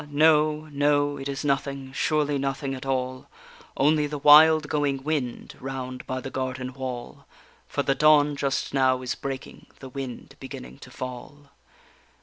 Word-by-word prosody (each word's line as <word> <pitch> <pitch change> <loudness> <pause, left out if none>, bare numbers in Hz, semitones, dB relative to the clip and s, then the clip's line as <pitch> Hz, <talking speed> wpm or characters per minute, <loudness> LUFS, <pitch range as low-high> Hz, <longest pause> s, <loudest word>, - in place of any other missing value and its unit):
no, 155 +1 +3
no, 145 0 +2
it 135 0 -5
is 140 +1 -4
nothing, 140 -1 -1
surely 150 -1 +1
nothing 135 0 -2
at 130 0 -7
all, 130 -1 -2 0.5
Only 150 +1 +3
the 150 0 -5
wild 155 +1 +7
going 145 -3 -1
wind 140 -5 -3
round 130 -1 -6
by 130 0 -3
the 135 - -7
garden 130 -1 -4
wall, 130 -2 -7 0.4
For - - -2
the 135 - +2
dawn 150 0 +4
just 140 -1 -2
now 130 -1 +2
is 125 - -2
breaking, 135 -1 -7
the 135 - -10
wind 130 -1 -7
beginning 60 +1 -9
to - - -12
fall. 130 +3 -8
135 Hz, 150 wpm, -25 LUFS, 130-145 Hz, 0.5 s, wild